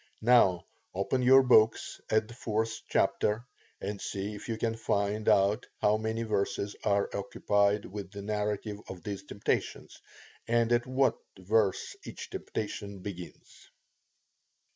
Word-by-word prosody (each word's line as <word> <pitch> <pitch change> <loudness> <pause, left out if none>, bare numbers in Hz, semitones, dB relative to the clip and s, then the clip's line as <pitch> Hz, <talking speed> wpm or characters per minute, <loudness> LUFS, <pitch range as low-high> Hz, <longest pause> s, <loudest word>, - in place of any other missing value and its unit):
Now, 110 -7 +5 0.3
open 100 +7 0
your 130 +2 +7
books 115 -3 +3
at 110 0 +2
the 120 - -11
4th 110 -1 -2
chapter, 110 +3 +1 0.3
and 100 0 -5
see 100 +2 -4
if 105 - -9
you 115 - -1
can 115 0 -1
find 105 -1 0
out 100 +4 +3
how 105 +1 +3
many 110 +1 -2
verses 100 -1 -1
are 100 -1 +2
occupied 100 +1 +1
with 100 -1 -7
the 100 0 -8
narrative 105 0 -2
of 90 -3 -8
these 100 -2 -4
temptations, 100 +1 -3 0.5
and 115 0 +2
at 120 +1 +2
what 130 +1 +2 0.2
verse 100 +1 +1
each - - -8
temptation 100 -2 -5
begins. 90 -4 -9
105 Hz, 135 wpm, -30 LUFS, 100-115 Hz, 0.5 s, your